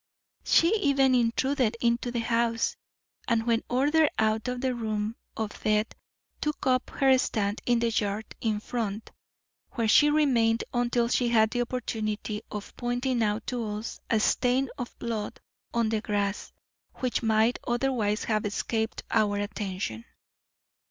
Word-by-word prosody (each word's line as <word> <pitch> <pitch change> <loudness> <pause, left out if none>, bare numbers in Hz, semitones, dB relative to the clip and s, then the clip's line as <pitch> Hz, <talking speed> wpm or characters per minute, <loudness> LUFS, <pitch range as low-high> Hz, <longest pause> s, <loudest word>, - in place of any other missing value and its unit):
She 340 +6 +4
even 275 -8 +3
intruded 245 0 +1
into 235 +1 +1
the 240 -1 -2
house; 230 0 +1 0.5
and 230 -2 +1
when 230 -1 +1
ordered 290 +5 +3
out 220 +1 +1
of 250 0 -2
the 260 0 0
room 215 -2 -2 0.2
of 220 -2 -4
death 215 +1 +1 0.5
took 300 -1 -2
up 255 -1 +2
her 270 -2 +4
stand 210 -4 -1
in 240 -1 +4
the 230 0 +1
yard 210 0 -1 0.2
in 215 -2 0
front, 220 -2 -4 0.6
where 230 -3 0
she 295 +7 +6
remained 240 -7 +3
until 240 -1 +1
she 245 0 +1
had 220 -2 +3
the 245 - 0
opportunity 220 -3 -3
of 210 -1 -7
pointing 245 0 -1
out 210 0 0
to 245 -2 -2
us 210 +1 -5
a 225 - +3
stain 250 +4 +2
of 245 - -7
blood 225 -3 -4 0.3
on 235 -2 +1
the 220 -1 0
grass, 205 -1 -2 0.4
which 255 -2 -1
might 220 +1 +2
otherwise 240 -4 0
have 215 -2 0
escaped 220 +2 -2
our 205 -1 +2
attention." 195 - -4
230 Hz, 145 wpm, -27 LUFS, 215-250 Hz, 0.6 s, she